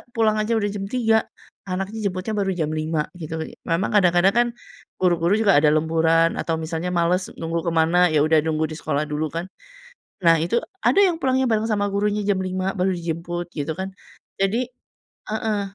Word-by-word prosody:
pulang 215 -2 +2
aja 225 +2 0
udah 215 - +1
jam 195 -1 -5
3.00, 225 -1 +1 0.4
anaknya 195 +3 -2
jemputnya 185 +3 -4
baru 195 -2 0
jam 155 -3 -1
5.00 155 0 -1 0.2
gitu. 160 0 -5 0.3
Memang 165 +4 0
kadang-kadang 180 -2 +4
kan 240 +3 +3 0.5
guru-guru 175 0 +2
juga 210 -8 +4
ada 150 - +3
lemburan, 165 +1 +2
atau 165 - -1
misalnya 160 +2 -4
males 175 +2 +1
nunggu 165 +1 -2
ke 170 - +2
mana, 170 +3 +4
ya 155 -3 +2
udah 155 0 +4
nunggu 155 0 -1
di - - -5
sekolah 145 +2 -1
dulu 150 +1 -2
kan. 165 +3 -4 0.8
Nah 165 -1 +5
itu 175 +8 0 0.2
ada - - +2
yang 345 -3 +1
pulangnya 260 -2 +2
bareng 225 -2 +1
sama 205 -2 +1
gurunya 205 +1 0
jam 195 -2 +1
5.00 185 +1 -2
baru 190 0 0
dijemput 170 +1 -4
gitu 155 +2 -4
kan. 190 +1 -5 0.5
Jadi 235 +6 0 0.6
heeh, 215 -1 -1
180 Hz, 180 wpm, -22 LUFS, 165-210 Hz, 0.8 s, Nah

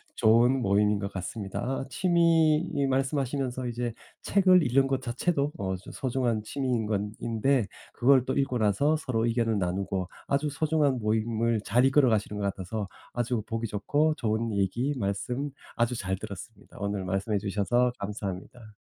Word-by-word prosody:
좋은 120 +4 +4
모임인 105 0 +2
것 100 0 -4
같습니다. 95 +1 -5
아 135 +1 -2
취미 165 0 +3 0.2
말씀하시면서 135 -1 -1
이제 120 -1 -3 0.3
책을 185 -3 +4
읽는 135 +1 +3
것 135 -1 -1
자체도 140 +4 -1
어 95 -1 -2
저 90 - -10
소중한 120 -4 -1
취미인 125 -2 -1
건 105 -1 -1
인데 115 +2 +1 0.3
그걸 130 0 +4
또 130 - -1
읽고 135 -3 0
나서 110 +9 +2
서로 120 -7 -1
의견을 115 -2 +1
나누고 95 0 -2 0.2
아주 145 +2 +1
소중한 145 -3 +1
모임을 110 +1 0
잘 125 +5 +3
이끌어 135 -1 +4
가시는 105 -1 0
것 100 - -1
같아서 100 +1 -3 0.3
아주 120 -1 -1
보기 115 0 -2
좋고 145 +10 +1
좋은 110 0 -1
얘기 115 +9 0
말씀 125 +7 -2 0.3
아주 120 +1 +1
잘 95 -3 -2
들었습니다. 100 +1 -10
오늘 100 -1 -2
말씀해 95 +3 -1
주셔서 105 +5 +1
감사합니다. 105 +2 -6
115 Hz, 340 characters per minute, -28 LUFS, 105-135 Hz, 0.3 s, 좋은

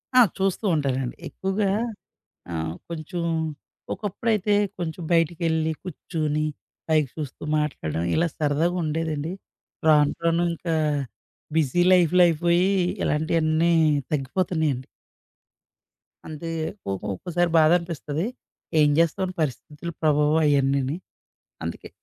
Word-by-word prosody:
ఆ! 255 - +8 0.2
చూస్తూ 195 +2 0
ఉంటానండి. 135 -4 -1
ఎక్కువగా 195 +1 -1 0.8
ఆహ్, 80 0 -2 0.2
కొంచెం 170 +1 -4 0.7
ఒకప్పుడైతే 210 0 0 0.3
కొంచెం 170 0 -4
బయటికెళ్లి, 165 -1 +1
కూర్చొని 155 -3 -2 0.4
పైకి 155 -4 +2
జూస్తూ 150 -3 -6
మాట్లాడడం 85 - -2
ఇలా 170 +2 +3
సరదాగుండేదండి. 160 0 0 0.6
రాను, 150 -2 +5
రాను 170 +1 +3
ఇంకా 165 0 -2 0.8
బిజీ 160 +3 +2
లైఫ్‌లైయిపోయి 175 +1 +4 0.3
ఇలాంటియన్నీ 160 +2 +2 0.4
తగ్గిపోతున్నాయండి. 150 -2 0 1.4
అంతే 160 +2 -6 0.4
కోపం 95 +1 -3
ఒక్కోసారి 175 - 0
బాధనిపిస్తది. 165 -1 +1 0.5
ఏం 150 -1 +6
జేస్తాం, 170 +3 +2
పరిస్థితుల 150 +3 -4
ప్రభావం 150 0 +3
అయన్నీని. 140 +1 +2 0.7
అందుకే - - -6
160 Hz, 85 wpm, -25 LUFS, 150-175 Hz, 1.4 s, ఆ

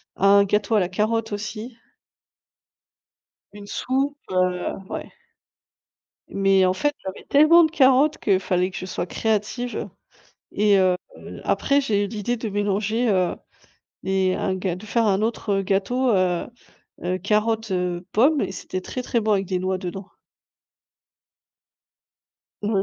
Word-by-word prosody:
un 200 +1 +5
gâteau 210 +3 +1
à - - +5
la 180 - +1
carotte 220 +3 -1
aussi. 215 +3 -6 1.8
Une 205 -1 -10
soupe, 270 +6 -1
heu 185 -1 0 0.2
ouais. - - -6 1.2
Mais 195 -1 +3
en 185 - +1
fait, 290 +9 0
j'avais 190 0 -7
tellement 310 +4 +6
de 315 - 0
carottes 280 0 +4
que 195 -3 +2
fallait 185 0 0
que 185 - -9
je - - -5
sois 185 - -4
créative, 220 +4 -2 0.6
et 205 -1 +3
heu, 185 -1 +3 0.5
après 280 0 +2
j'ai 205 -6 0
eu - - -4
l'idée 220 +3 -2
de 225 -1 -4
mélanger, 205 +3 0
heu, 185 -2 +1 0.7
et 190 -1 +1
un 190 - -1
ga 185 -1 -2
de 200 - -11
faire 225 +1 +1
un 195 0 +2
autre, 220 -2 -1
heu, - - -2
gâteau, 240 +7 0
heu 180 -2 +1 0.6
heu, 180 +1 -1
carotte, 215 +2 0
heu, 180 -1 -2
pomme 280 +7 +4
et - - -2
c'était 185 0 -5
très, 250 +6 -5
très 240 - 0
bon, 215 -1 +1
avec 195 -1 0
des 185 0 -2
noix 185 0 -1
dedans. 185 +1 -7 2.5
Ouais. 205 -2 +1
205 Hz, 145 wpm, -23 LUFS, 185-230 Hz, 2.5 s, tellement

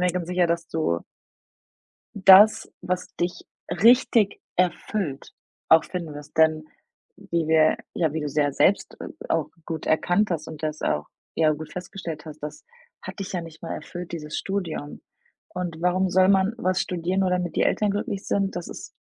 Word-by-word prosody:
mir 180 - +3
ganz 180 -2 -3
sicher, 180 -1 +2
dass 170 0 -1
du 85 - 0 1.1
das, 205 +3 +7
was 180 0 -2
dich 175 +1 -3 0.2
richtig 230 -2 +4 0.2
erfüllt, 180 -4 -1 0.4
auch 160 0 +7
finden 170 -4 -5
wirst. 145 +1 -11
Denn 155 -1 +4 0.5
wie 170 -2 -2
wir 155 -1 +4 0.2
ja, 160 -4 +1
wie 160 - -2
du's 150 -1 -5
ja 145 -1 +2
selbst, 195 +8 +2
äh, - - -6 0.2
auch - - 0 0.2
gut 160 -2 -5
erkannt 175 +6 +2
hast 160 -2 -3
und 155 -2 -9
das 155 0 -3
auch, 75 0 0 0.3
ja, 155 -1 +3
gut 155 +1 -6
festgestellt 180 -4 -7
hast, 155 -1 -10
das 150 0 -8 0.4
hat - - -8
dich 195 -1 -5
ja 180 - -1
nicht 165 -1 -11
mal 165 - -5
erfüllt, 175 0 -7
dieses 150 -2 -5
Studium. 180 -7 -4 0.5
Und 180 -2 -4
warum 185 +1 +2
soll 185 +1 +4
man 195 +2 +3
was 185 -5 0
studieren, 180 +1 -1
nur 190 - +2
damit 180 -2 -1
die - - +3
Eltern 210 - +1
glücklich 205 -1 -3
sind? 195 -1 0
Das 175 - -5
ist - - -9
175 Hz, 175 wpm, -24 LUFS, 155-190 Hz, 1.1 s, das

